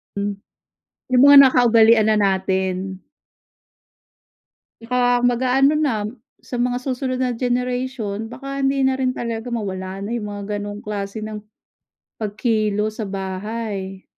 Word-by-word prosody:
Hmm. 200 0 -2 0.8
Yung 250 - +5
mga 285 - +9
nakaugalian 230 -3 +5
na 215 - +3
natin. 190 -1 -1 1.8
Tsaka 245 +1 +1
mag-aano 260 +4 +3
na, 225 -9 0 0.3
sa 245 - -6
mga 245 +1 0
susunod 255 0 -2
na 250 -2 -1
generation, 245 -3 -2
baka 275 +3 -4
hindi 275 0 +1
na 265 0 +2
rin 255 -1 0
talaga, 235 0 -4
mawala 190 -3 -4
na 200 - -5
yung 215 - -5
mga 205 +1 -4
ganong 205 0 -6
klase 205 0 -5
ng 215 0 -5 0.8
pagkilos 215 0 -1
sa 210 - -3
bahay. 195 0 -5
225 Hz, 125 wpm, -21 LUFS, 205-250 Hz, 1.8 s, mga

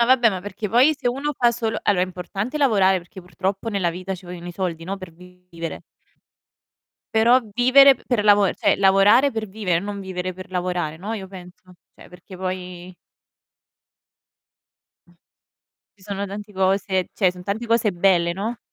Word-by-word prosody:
No 235 - +4
vabbè 245 -3 +5
ma 185 -2 -4
perché 205 +2 -6
poi 260 +8 +5
se 275 - -5
uno 275 +4 -1
fa 240 -2 +3
solo 225 -2 -2
allo 200 -3 +2
è - - +3
importante 185 - -4
lavorare, 200 -9 +3
perché 185 +3 -12
purtroppo 190 +4 -4
nella 195 -5 0
vita 185 +2 -5
ci 185 0 -13
vogliono 175 0 -9
i 175 - -7
soldi, 170 -3 -4
no, 195 +2 -4
per 185 -3 -11
vivere. 180 -1 -9 1.3
Però 230 +3 +5
vivere 265 +3 +6
per 240 -4 -2
lavo 205 -2 +5
cioè, - - +2
lavorare 200 +7 +5
per 220 -2 -4
vivere, 190 -4 -1
non 200 +1 -6
vivere 185 -1 -4
per 185 +1 -11
lavorare, 180 -4 -2
no, 200 +6 -6
io 195 -4 -6
penso, 180 -1 -14 0.2
cioè - - -16
perché 180 +1 -13
poi 185 -1 -6 2.1
Mh. 175 - -24 0.8
Ci 190 - -24
sono 200 0 -4
tanti 205 +1 -8
cose 190 0 0
cioè 190 -4 +2
son 180 0 -12
tanti 205 +5 -4
cose 230 -2 +2
belle, 175 -1 +2
no? 215 +6 -4
195 Hz, 170 wpm, -22 LUFS, 180-220 Hz, 2.1 s, vivere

